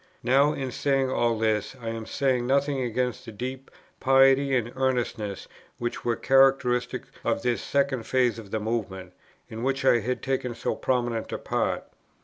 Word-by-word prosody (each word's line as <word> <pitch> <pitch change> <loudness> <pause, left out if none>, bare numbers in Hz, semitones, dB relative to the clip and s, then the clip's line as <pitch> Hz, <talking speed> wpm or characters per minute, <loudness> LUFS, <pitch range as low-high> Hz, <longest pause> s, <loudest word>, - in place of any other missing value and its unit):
Now, 135 +4 +4
in 135 -3 -4
saying 135 0 +1
all 120 -3 +1
this, 110 +1 0
I 115 -2 -5
am 115 -1 -5
saying 130 -3 0
nothing 140 0 +1
against 125 -1 -2
the - - -9
deep 130 +5 -6 0.3
piety 135 +1 +4
and 120 -1 -1
earnestness 120 -6 -2 0.3
which 120 0 -4
were 120 -1 +1
characteristics 135 -2 +2
of - - 0
this 125 -1 0
second 140 -4 0
phase 125 -3 +2
of 105 -3 -11
the 110 - -2
Movement, 95 -5 -4 0.3
in 110 +1 -7
which 135 +1 -1
I 120 - +5
had 125 +3 -3
taken 130 -2 -2
so 115 - -2
prominent 120 -3 -1
a - - -2
part. - - -1
125 Hz, 165 wpm, -26 LUFS, 115-135 Hz, 0.3 s, I